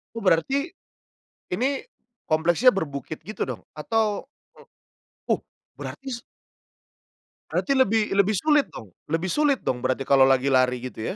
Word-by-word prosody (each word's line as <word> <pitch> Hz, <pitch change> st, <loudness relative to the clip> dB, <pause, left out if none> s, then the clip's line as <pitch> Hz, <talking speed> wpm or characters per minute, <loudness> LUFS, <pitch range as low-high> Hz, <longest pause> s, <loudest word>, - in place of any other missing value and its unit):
Oh, 230 Hz, -, -4 dB
berarti 270 Hz, -, +2 dB, 0.8 s
ini 260 Hz, +8 st, 0 dB, 0.4 s
kompleksnya 170 Hz, +10 st, +4 dB
berbukit 155 Hz, -4 st, -4 dB
gitu 215 Hz, -, -3 dB
dong? -, -, -5 dB
Atau 215 Hz, -, -1 dB, 1.0 s
o -, -, +3 dB
uh, -, -, -1 dB, 0.4 s
berarti 275 Hz, -, -8 dB
s 235 Hz, -, -6 dB, 1.3 s
berarti 275 Hz, -, -1 dB
lebih 220 Hz, -3 st, +3 dB
lebih 200 Hz, +2 st, +3 dB
sulit 295 Hz, +4 st, +3 dB
dong 100 Hz, -5 st, -11 dB, 0.2 s
lebih 165 Hz, +4 st, -1 dB
sulit 295 Hz, -3 st, +2 dB
dong 125 Hz, -, -1 dB
berarti 130 Hz, +2 st, -1 dB
kalau 135 Hz, 0 st, +5 dB
lagi 135 Hz, +1 st, +3 dB
lari 125 Hz, -1 st, +2 dB
gitu 125 Hz, -, -5 dB
185 Hz, 135 wpm, -25 LUFS, -, 1.3 s, kalau